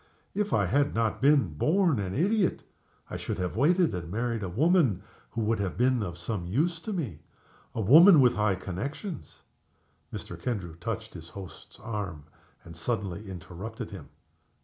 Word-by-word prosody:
If 210 +1 -1
I - - +3
had 145 +1 +1
not 115 -2 0
been 145 +1 +6
a - - -1
born 150 - +1
idiot 175 - +1 0.5
I - - -3
should - - -4
have 90 -1 -2
waited, 170 - +3
and 85 -2 -5
married 115 +3 -1
a 95 - -3
woman 135 - +3 0.3
who 115 - -3
would 110 0 +1
have 95 -3 -2
been 125 0 +3
of 90 -4 -4
some 85 0 -4
use 160 - 0
to 215 - -6
me; 135 - -3 0.6
a 110 - -1
woman 160 - +8
with 125 -3 +6
high 105 -2 +1
connections 95 - -6 0.3
" - - -41
Mr. - - -7
Kendrew 100 -9 -3
touched 110 +5 -5
his 85 -1 -9
host's 95 -2 -11
arm, 100 -9 -5 0.4
and 85 - -11
suddenly 100 0 -3
interrupted 95 +6 -7
him. 100 - -9
110 Hz, 170 wpm, -28 LUFS, 95-145 Hz, 0.6 s, woman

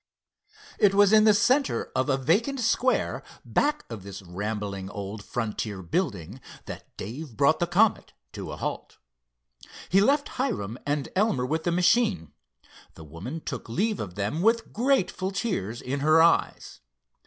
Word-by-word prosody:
It 195 -1 +4
was 205 +1 +5
in 215 0 +7
the 215 - +7
center 260 +7 +1
of 130 +3 0
a 135 - +2
vacant 205 - +1
square 245 +2 +1 0.2
back 295 +1 0
of 115 -4 -7
this 100 0 -9
rambling 100 +1 -4
old 100 +1 -6
frontier 105 -4 -4
building, 105 - -3 0.2
that - - -10
Dave 120 +3 -7
brought - - +3
the - - +1
Comet - - +2 0.2
to - - -7
a - - -7
halt. - - -5 0.9
He 195 +2 +5
left 285 +6 +3
Hiram 125 - -2
and 145 -1 -1
Elmer 185 - +2
with 160 +4 -2
the 175 - +2
machine. 190 +4 +2 0.6
The 80 - -11
woman 90 - -7
took 125 -6 -6
leave 205 - 0
of 90 -4 -6
them 105 +11 -2
with 225 +3 +1
grateful 235 -6 +1
tears 155 - -3
in 135 +3 -2
her 155 +3 +4
eyes. 165 +1 +2
155 Hz, 155 wpm, -26 LUFS, -, 0.9 s, in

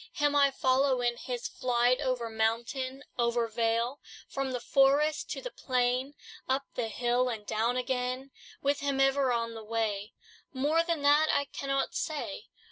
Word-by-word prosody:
Him 290 0 +1
I 280 -1 +6
follow 265 0 +2
in 240 0 +1
his 245 -1 -4
flight, 245 0 +1
Over 250 -2 -1
mountain, 235 +5 -1 0.2
over 235 0 +2
vale, 230 +3 0 0.3
From 275 -1 -3
the 250 -1 -2
forest 280 +4 +3
to - - -4
the - - -5
plain, 255 - 0 0.3
Up 265 +1 +1
the 240 -2 -2
hill, 245 +3 +1
and 220 -3 -5
down 230 +4 0
again. 255 +1 -2 0.3
With 280 +1 +2
him 280 -1 -1
ever 270 -1 +3
on 230 -1 -1
the 225 -1 -8
way: 215 -1 -2 0.4
More 290 +5 +2
than 335 -3 -2
that, 295 +2 +5
I 285 0 +1
cannot 275 0 -2
say. 300 -2 -3
255 Hz, 160 wpm, -30 LUFS, 235-275 Hz, 0.4 s, I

